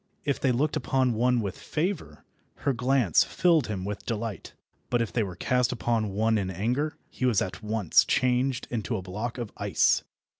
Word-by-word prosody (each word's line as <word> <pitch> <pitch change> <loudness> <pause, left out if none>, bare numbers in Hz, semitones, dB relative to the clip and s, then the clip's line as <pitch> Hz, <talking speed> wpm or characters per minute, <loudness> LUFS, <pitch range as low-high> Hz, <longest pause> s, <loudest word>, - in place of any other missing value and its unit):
If 140 -2 0
they 130 - +2
looked 145 +6 +1
upon 130 -3 +1
one 120 +2 +2
with 100 -3 -3
favour, 155 - -3 0.4
her 140 - +3
glance 125 - +3
filled 170 -4 +2
him 95 -4 -4
with 105 0 -5
delight; 115 -2 -4 0.4
but 120 - +2
if 115 -2 -2
they 120 - +1
were 95 -4 -3
cast 125 +6 +1
upon 115 -3 0
one 110 +2 +1
in 95 -2 -2
anger, 120 - -1
he 130 - -1
was 115 -6 +3
at 95 +2 -4
once 105 -4 +3
changed 125 0 +1
into 110 -4 -2
a 95 - -6
block 105 +7 -4
of 120 -4 -5
ice. 100 -3 +3
115 Hz, 185 wpm, -27 LUFS, 105-130 Hz, 0.4 s, her